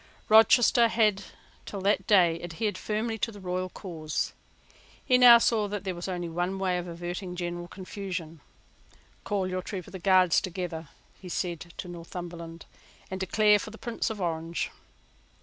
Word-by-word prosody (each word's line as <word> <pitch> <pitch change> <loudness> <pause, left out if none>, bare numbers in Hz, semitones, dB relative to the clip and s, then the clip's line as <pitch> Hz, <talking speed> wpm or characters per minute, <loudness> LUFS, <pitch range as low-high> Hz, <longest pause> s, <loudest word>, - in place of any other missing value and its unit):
Rochester 225 +2 +6
had 215 -4 +2 0.4
till 200 - -5
that 200 +2 +1
day 175 -5 +4
adhered 180 +4 -3
firmly 220 +3 -2
to 230 - -1
the 205 - -11
royal 185 0 -3
cause. 160 -6 -4 0.7
He 250 -1 +4
now 245 -2 +10
saw 225 -2 +2
that 205 -1 -4
there 190 -2 -2
was 175 +1 -6
only 175 -2 -3
one 175 +3 -2
way 185 -2 0
of 175 - -6
averting 175 +2 -5
general 175 0 -4
confusion. 185 -4 -6 0.8
"Call 200 -3 -1
your 185 0 -2
troop 185 -1 -6
of 190 -1 -9
Guards 185 -2 +4
together," 170 -4 -5 0.3
he 185 - -9
said 175 -1 -3
to - - -6
Northumberland, 170 -1 -8 0.5
"and 190 - -4
declare 210 +2 +4
for 215 - -6
the 220 - -11
Prince 235 0 -3
of 220 -2 -5
Orange." 165 -1 -2
185 Hz, 160 wpm, -28 LUFS, 175-205 Hz, 0.8 s, now